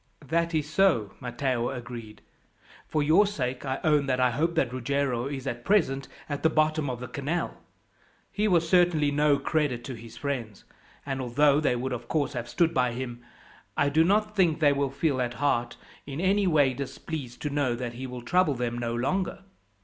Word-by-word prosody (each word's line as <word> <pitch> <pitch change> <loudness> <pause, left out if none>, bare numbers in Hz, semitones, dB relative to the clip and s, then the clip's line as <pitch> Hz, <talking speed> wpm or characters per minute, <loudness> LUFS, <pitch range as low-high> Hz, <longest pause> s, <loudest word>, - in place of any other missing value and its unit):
"That 170 +1 +1
is 150 -2 0
so," 155 - +2
Matteo 125 -1 -1
agreed. 120 -4 -8 0.6
"For 155 -1 0
your 165 +8 +5
sake, 130 -8 -3
I 130 0 -1
own 150 -3 +3
that 130 -1 +1
I 125 -1 +3
hope 165 +8 0
that 130 -6 +1
Ruggiero 130 -1 -1
is 140 -2 -5
at 120 -2 -4
present 135 -8 +2 0.2
at 145 -1 -4
the 160 - +4
bottom 155 -2 +1
of 125 -2 -4
the 125 - -6
canal. 150 +7 -3 0.7
He 210 +1 0
was 170 -4 +3
certainly 170 -4 +3
no 145 0 +3
credit 140 -4 -1
to 130 - -6
his 115 -1 -11
friends; 120 -8 -4 0.4
and 135 -1 -3
although 140 +4 +3
they 140 -5 +1
would 130 +2 -2
of 120 -1 -6
course 150 0 0
have 120 0 -4
stood 170 +4 +2
by 125 -4 +1
him, 120 -1 -5 0.6
I 145 - +3
do 160 +3 +4
not 210 +4 +2
think 170 -6 +3
they 145 -3 +5
will 140 -1 0
feel, 135 -1 0
at 120 -1 -2
heart, 120 -4 0 0.3
in 140 +1 -5
any 195 +2 +2
way 145 -6 +4
displeased 135 -1 -6
to 150 - -2
know 140 -4 +1
that 120 -1 -4
he 130 +2 -6
will 125 -1 -7
trouble 175 +1 +2
them 120 -1 -2
no 115 -1 -2
longer. 185 +9 -1
140 Hz, 195 wpm, -27 LUFS, 125-160 Hz, 0.7 s, your